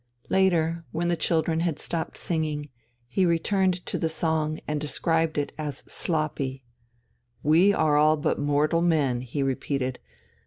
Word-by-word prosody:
Later, 170 -3 +2
when 170 +1 -1
the 175 - +2
children 160 0 +1
had 165 -3 0
stopped 165 -1 -3
singing, 155 -3 -2 0.4
he 160 +10 +1
returned 180 +1 +1
to - - -2
the 165 - 0
song 160 -1 -1
and 150 -1 -2
described 160 +1 0
it 145 - -1
as 145 -3 -3
"sloppy." 145 -5 -1 0.8
"We 165 +7 +5
are 155 -6 +2
all 155 +1 +4
but 150 - -1
mortal 145 +3 +2
men," 145 -8 +2
he 130 +3 -3
repeated. 135 -1 -2
155 Hz, 145 wpm, -26 LUFS, 145-170 Hz, 0.8 s, We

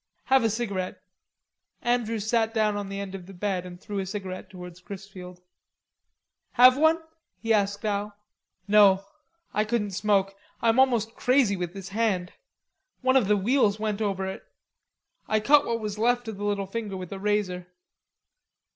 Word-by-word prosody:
"Have 265 -2 +3
a 225 - +3
cigarette." 200 -5 -3 0.8
Andrews 230 -3 0
sat 225 0 +1
down 215 -1 +2
on 205 -1 -4
the 195 0 -5
foot 190 - -10
of 185 -2 -8
the 195 - -11
bed 185 -1 -2
and 175 0 -10
threw 205 +1 -5
a 190 - -2
cigarette 190 -1 -6
towards 180 -2 -10
Chrisfield. 185 -2 -10 1.1
"Have 255 +1 +7
one?" 315 +3 +4 0.4
he 225 -1 +1
asked 205 +1 0
Al. 205 0 -2 0.5
"No. 200 -2 +5 0.5
I 210 - +2
couldn't 210 -2 -1
smoke. 195 0 +1 0.2
I'm 230 +1 +2
almost 235 -4 +3
crazy 250 -6 +2
with 180 0 -5
this 195 -1 -7
hand. 195 -4 -1 0.7
One 260 0 +2
of 250 -7 +4
the 210 0 +3
wheels 210 0 +2
went 215 -1 -2
over 195 -2 -1
it.... 190 - -6 0.8
I 215 - +2
cut 285 +7 +4
what 230 0 -1
was 210 -1 -5
left 245 +1 +1
of 220 -3 -5
the 205 - -4
little 200 -1 -1
finger 205 0 -5
off - - -5
with 180 - -8
a 195 - -5
razor." 195 -3 -1
205 Hz, 170 wpm, -26 LUFS, 195-225 Hz, 1.1 s, Have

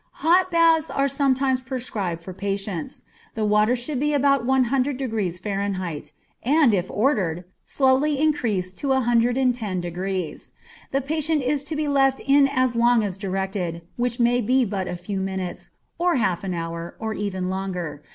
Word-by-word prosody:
_ - - -43 0.2
Hot 360 +3 +4
baths 330 -2 +4
are 275 0 +1
sometimes 270 -1 +1
prescribed 220 -10 -4
for 185 - -7
patients. 195 -3 -4 0.3
The 220 -1 0
water 210 +3 +3
should 255 +2 -3
be 295 +2 +1
about 275 -2 +3
100 265 +1 +1
degrees 215 -9 -2
F., 195 -6 -2 0.4
and, 280 -2 +4
if 185 -2 0
ordered, 195 - 0 0.2
slowly 275 +2 +2
increased 215 -12 0
to 285 - -3
110°. 230 - 0 0.4
The 275 - 0
patient 310 +1 0
is 275 +2 0
to 310 - -4
be 305 0 -1
left 270 -2 +3
in 275 0 +4
as 255 -3 0
long 235 -1 +4
as 195 -3 -3
directed, 190 -3 -3
which 245 0 -1
may 245 +1 +3
be 255 +3 +2
but 195 -3 -3
a 180 - -3
few 190 +3 -4
minutes, 190 -1 -4 0.3
or 350 -1 +2
half 190 -8 0
an 185 -2 -3
hour, 165 0 -5
or 220 -1 -3
even 190 -3 -3
longer. 180 -6 -4
235 Hz, 160 wpm, -23 LUFS, 190-275 Hz, 0.4 s, Hot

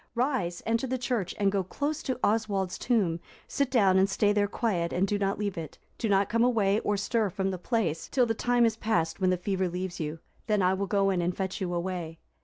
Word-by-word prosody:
Rise, 235 -9 -1
enter 230 +3 0
the 260 +1 -1
church, 240 -7 -2
and 200 -2 +2
go 195 -1 0
close 290 - -3
to 260 -3 -3
Oswald's 205 -4 0
tomb; 195 -9 +1 0.3
sit 280 -2 0
down 195 -7 +4
and 195 +1 +3
stay 205 +1 +2
there 205 -1 +2
quiet 190 -6 -1
and 190 +2 +1
do 205 +1 -1
not 195 0 0
leave 205 -4 -2
it; 155 -3 -8 0.2
do 225 - -1
not 195 0 +3
come 230 +1 +2
away, 215 -4 +3
or 205 -2 0
stir 215 +1 0
from 195 +1 -2
the 185 - -5
place, 180 -7 -1
till 255 -3 +2
the 225 - 0
time 245 +1 +2
is 225 -1 +1
past, 170 -8 -1
when 185 - +3
the 185 - +2
fever 185 0 -1
leaves 180 0 -4
you: 155 0 -3 0.3
then 210 -3 +2
I 180 +1 +3
will 195 +1 -2
go 195 0 +2
in 180 -2 0
and 175 +1 -1
fetch 190 -1 -3
you 180 -2 -1
away." 175 -2 -3
200 Hz, 235 wpm, -28 LUFS, 185-225 Hz, 0.3 s, down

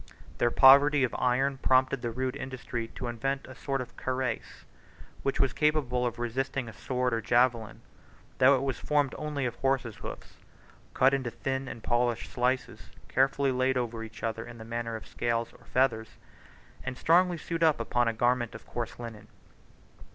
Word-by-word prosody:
37 - - -21
Their 120 - +3
poverty 140 +3 +7
of 125 - 0
iron 130 +2 +1
prompted 130 0 +3
their 120 - -2
rude 130 +2 -2
industry 125 -3 -5
to - - -5
invent 135 +4 -2
a 130 - -9
sort 135 0 -3
of 125 - -9
cuirass, 130 -3 -3 0.6
which 135 - -1
was 135 - +2
capable 135 -5 +1
of 120 0 -5
resisting 130 +2 -2
a 110 - -8
sword 125 +2 -1
or 115 - 0
javelin, 120 -1 +1 0.6
though 135 +2 +7
it 130 - -1
was 135 -3 -2
formed 145 -2 +1
only 150 -3 -2
of 120 - -1
horses' 130 -5 0
hoofs, - - -9 0.6
cut 130 +1 +5
into 130 -3 0
thin 135 +2 -3
and 115 - -8
polished 120 -1 0
slices, 125 0 -1 0.2
carefully 135 +1 +2
laid 130 0 +1
over 120 -2 -2
each 115 0 -11
other 115 0 -2
in 115 - -10
the 110 - -9
manner 115 0 -3
of 110 - -8
scales 115 -1 -2
or - - -19
feathers, 115 -4 0 0.7
and 130 -1 -5
strongly 175 +3 +3
sewed 165 +1 -4
upon 120 -6 +2
an 115 - +1
under - - -17
garment 120 0 +1
of - - -10
coarse 120 -2 -5
linen. 115 -3 -8
125 Hz, 180 wpm, -29 LUFS, 120-135 Hz, 0.7 s, poverty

